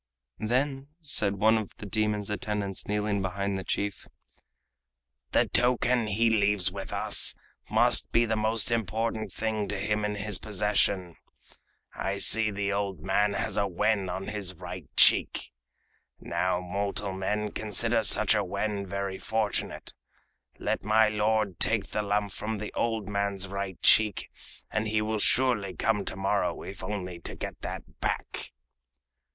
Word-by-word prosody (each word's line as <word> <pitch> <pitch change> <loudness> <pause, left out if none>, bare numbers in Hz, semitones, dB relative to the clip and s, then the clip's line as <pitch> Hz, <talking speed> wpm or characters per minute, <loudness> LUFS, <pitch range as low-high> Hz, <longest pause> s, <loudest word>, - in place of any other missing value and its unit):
Then 135 +4 -1
said 105 -9 +2
one 110 +3 +4
of 105 - -8
the - - -8
demon's 105 0 -1
attendants 105 -1 -3
kneeling 105 -1 0
behind 100 +1 -2
the 95 - -4
chief: 100 +1 -3 1.2
"The - - +3
token 125 -1 +2
he 110 +3 +2
leaves 100 -3 +2
with 95 0 -7
us - - +1 0.3
must - - +2
be 120 - +4
the 110 -1 0
most 110 +3 +1
important 110 -1 -1
thing 110 -2 -2
to 105 - -3
him 105 +1 -1
in 105 0 -1
his 105 -2 0
possession. 100 -4 +1 0.8
I 95 +1 -2
see 110 +2 +5
the 100 -1 -2
old 100 -2 -2
man 100 +2 +1
has - - -2
a 100 - +1
wen 100 +1 0
on 95 +2 -4
his 100 -4 -4
right 90 -2 -8
cheek. - - +4 0.7
Now 90 -1 -1
mortal 100 +2 -3
men 105 +3 -2
consider 115 +2 +1
such 110 0 +4
a 105 -1 +1
wen 100 +1 -3
very 100 0 -3
fortunate. 110 +2 -2 0.6
Let - - -2
my 110 +1 +4
lord 105 -3 0
take 110 -3 +2
the 105 - 0
lump 105 -1 -1
from 110 0 -4
the 105 +1 -6
old 115 -3 -1
man's 100 -1 0
right 100 -2 -5
cheek, 105 -3 +4 0.4
and 110 0 -1
he 110 0 +1
will 110 0 -1
surely 105 -6 +3
come 105 +2 0
to - - -3
morrow, 95 -1 -1
if 95 -1 -8
only 90 -3 -4
to - - -6
get - - -7
that - - -7
back." - - -3
105 Hz, 150 wpm, -28 LUFS, 100-110 Hz, 1.2 s, see